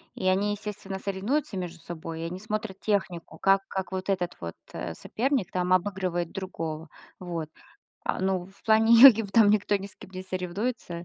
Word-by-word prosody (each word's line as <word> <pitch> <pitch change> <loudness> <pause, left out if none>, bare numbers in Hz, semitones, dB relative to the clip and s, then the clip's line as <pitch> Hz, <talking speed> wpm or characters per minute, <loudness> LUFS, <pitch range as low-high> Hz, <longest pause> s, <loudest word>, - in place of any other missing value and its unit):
И 185 - -2
они, 195 +2 +2
естественно, 205 -2 -5
соревнуются 200 +5 -2
между 175 -2 -5
собой, 165 -1 -7
и - - -4
они 180 +2 -5
смотрят 215 -1 -4
технику, 180 -6 -2
как 195 0 +3
как 190 0 -4
вот 190 0 -4
этот 180 -3 -1
вот, 85 -1 -6 0.2
э, - - -4
соперник 245 - -1
там 180 0 +1
обыгрывает 185 -2 0
другого. 165 -5 -5 0.3
Вот. 170 -4 -5 0.6
А, - - -1
ну, 185 -1 0
в 195 +1 -21
плане 220 +1 +5
йоги 250 -4 +11
в 200 - -8
там 220 -2 +6
никто 205 -1 +2
ни 195 0 -6
с 200 - -14
кем - - -13
не 185 0 -6
соревнуется. 185 0 -4
190 Hz, 185 wpm, -27 LUFS, 175-205 Hz, 0.6 s, йоги